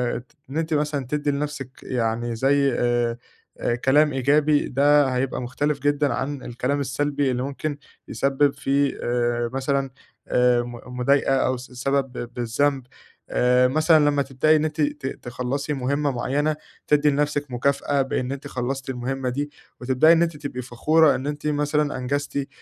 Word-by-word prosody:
آآ -, -, -1 dB
ت 130 Hz, +5 st, -19 dB, 0.2 s
إن 145 Hz, -, -4 dB
أنتِ 160 Hz, -1 st, -1 dB
مثلًا 145 Hz, -2 st, 0 dB
تدّي 145 Hz, -1 st, 0 dB
لنفْسِك 145 Hz, -2 st, -4 dB
يعني 115 Hz, -1 st, -1 dB
زي 140 Hz, +2 st, +2 dB
آآ 120 Hz, -1 st, +1 dB, 0.7 s
كلام 150 Hz, +2 st, +4 dB
إيجابي 145 Hz, +3 st, +2 dB
ده 145 Hz, +2 st, +4 dB
هيبقى 125 Hz, 0 st, -1 dB
مختلف 140 Hz, +4 st, -1 dB
جدًا 145 Hz, +1 st, +1 dB
عن 140 Hz, 0 st, -3 dB
الكلام 125 Hz, +4 st, -2 dB
السلبي 145 Hz, -1 st, 0 dB
اللي 125 Hz, +1 st, -2 dB
ممكن 140 Hz, +1 st, -4 dB, 0.3 s
يسبّب 140 Hz, +1 st, +1 dB
في 140 Hz, 0 st, 0 dB
آآ، 120 Hz, -1 st, 0 dB
مثلًا 135 Hz, 0 st, 0 dB, 0.4 s
آآ 125 Hz, -1 st, +3 dB
م 120 Hz, +1 st, -9 dB
مضايقة 135 Hz, +1 st, +3 dB
أو 130 Hz, -1 st, +1 dB
س 125 Hz, +1 st, -11 dB
سبب 135 Hz, +1 st, -1 dB, 0.2 s
بالذنب، 130 Hz, +4 st, 0 dB, 0.5 s
آآ 125 Hz, +1 st, +3 dB
مثلًا 155 Hz, +1 st, +4 dB
لمّا 145 Hz, -1 st, +1 dB
تبدأي 140 Hz, +3 st, +2 dB
إن 155 Hz, -, +2 dB
أنتِ 155 Hz, 0 st, -2 dB
ت 145 Hz, -2 st, -1 dB, 0.2 s
تخلّصي 130 Hz, +4 st, -3 dB
مهمّة 140 Hz, +2 st, 0 dB
معيّنة، 145 Hz, +5 st, 0 dB, 0.3 s
تدّي 150 Hz, 0 st, +4 dB
لنفْسِك 145 Hz, 0 st, -1 dB
مكافأة 140 Hz, +3 st, +1 dB
بإن 130 Hz, -1 st, -2 dB
أنتِ 140 Hz, +1 st, -6 dB
خلصتِ 130 Hz, +1 st, -4 dB
المهمّة 130 Hz, +1 st, -3 dB
دي، 145 Hz, +3 st, -3 dB, 0.3 s
وتبدأي 130 Hz, +6 st, +5 dB
إن 165 Hz, -, +3 dB
أنتِ 165 Hz, -3 st, -2 dB
تبقي 140 Hz, -4 st, -5 dB
فخورة 150 Hz, +6 st, +3 dB
إن 130 Hz, -, -4 dB
أنتِ 150 Hz, +1 st, -4 dB
مثلًا 150 Hz, -1 st, 0 dB
أنجزتِ 140 Hz, +3 st, -2 dB
آآ 140 Hz, 0 st, -1 dB
140 Hz, 160 wpm, -23 LUFS, 125-145 Hz, 0.7 s, وتبدأي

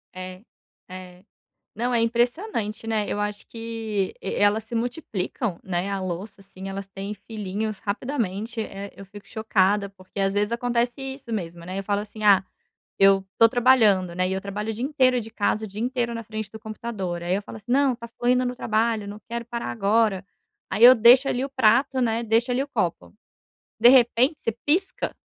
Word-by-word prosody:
É, 185 Hz, +1 st, -8 dB, 0.5 s
é. 185 Hz, 0 st, -10 dB, 0.5 s
Não, 240 Hz, +3 st, -1 dB
é 235 Hz, -, +3 dB
impressionante, 235 Hz, -, -1 dB
né. 215 Hz, -2 st, 0 dB
Eu 205 Hz, -, -2 dB
acho 205 Hz, 0 st, -3 dB
que 225 Hz, -4 st, -3 dB
e 195 Hz, -, -4 dB
elas 205 Hz, +1 st, +3 dB
se 225 Hz, -, -12 dB
multiplicam, 230 Hz, -, -3 dB
né. 190 Hz, +2 st, -2 dB
A 195 Hz, -, -2 dB
louça, 190 Hz, +3 st, -5 dB
assim, 195 Hz, 0 st, -10 dB
elas 195 Hz, 0 st, -6 dB
têm 195 Hz, +1 st, -6 dB
filhinhos 210 Hz, 0 st, -5 dB
rapidamente. 225 Hz, -1 st, -3 dB
Eh, 200 Hz, -1 st, -7 dB
eu 195 Hz, -, -11 dB
fico 205 Hz, +1 st, -13 dB
chocada, 205 Hz, -2 st, +1 dB
porque, 190 Hz, 0 st, -11 dB
às 195 Hz, 0 st, +1 dB
vezes, 205 Hz, +2 st, 0 dB
acontece 240 Hz, +2 st, -1 dB
isso 265 Hz, -2 st, -7 dB
mesmo, 170 Hz, -4 st, -5 dB
né? 185 Hz, +2 st, -5 dB
Eu 195 Hz, -, -3 dB
falo 200 Hz, +1 st, 0 dB
assim: 215 Hz, 0 st, -9 dB
“Ah, 195 Hz, -2 st, +6 dB, 0.6 s
eu 195 Hz, 0 st, +5 dB
tô 230 Hz, -, +8 dB
trabalhando, 225 Hz, -8 st, +4 dB
né?”. 185 Hz, +1 st, 0 dB
E -, -, -2 dB
eu 190 Hz, -, -2 dB
trabalho 205 Hz, +3 st, -4 dB
o -, -, -1 dB
dia 240 Hz, +4 st, -3 dB
inteiro 260 Hz, -4 st, +2 dB
de 225 Hz, 0 st, -9 dB
casa. 215 Hz, +1 st, 0 dB
O -, -, -6 dB
dia 200 Hz, +3 st, -8 dB
inteiro 240 Hz, -1 st, -1 dB
na 230 Hz, -, -5 dB
frente 215 Hz, -1 st, -6 dB
do 220 Hz, -, -9 dB
computador. 215 Hz, -6 st, -5 dB
Aí 175 Hz, +2 st, 0 dB
eu 200 Hz, -, -1 dB
falo 220 Hz, -, -10 dB
assim: 230 Hz, +3 st, -11 dB
“Não, 270 Hz, -1 st, +3 dB
tá 235 Hz, 0 st, -9 dB
fluindo 250 Hz, +2 st, +1 dB
no 245 Hz, -, -2 dB
trabalho. 220 Hz, -2 st, 0 dB
Não 210 Hz, +1 st, -8 dB
quero 235 Hz, 0 st, -3 dB
parar 235 Hz, 0 st, -4 dB
agora”. 200 Hz, -, +1 dB, 0.4 s
Aí 220 Hz, -, -2 dB
eu 255 Hz, +1 st, +11 dB
deixo 245 Hz, +4 st, +6 dB
ali 255 Hz, +1 st, 0 dB
o -, -, -4 dB
prato, 260 Hz, +1 st, +3 dB
né, 230 Hz, -1 st, 0 dB
deixo 230 Hz, +3 st, +2 dB
ali 245 Hz, +1 st, +1 dB
o -, -, -5 dB
copo. 175 Hz, -10 st, -2 dB, 0.7 s
De 240 Hz, -, +8 dB
repente, 250 Hz, +3 st, +5 dB
você 230 Hz, -, -1 dB
pisca, 375 Hz, +6 st, 0 dB
220 Hz, 195 wpm, -24 LUFS, 195-240 Hz, 0.7 s, eu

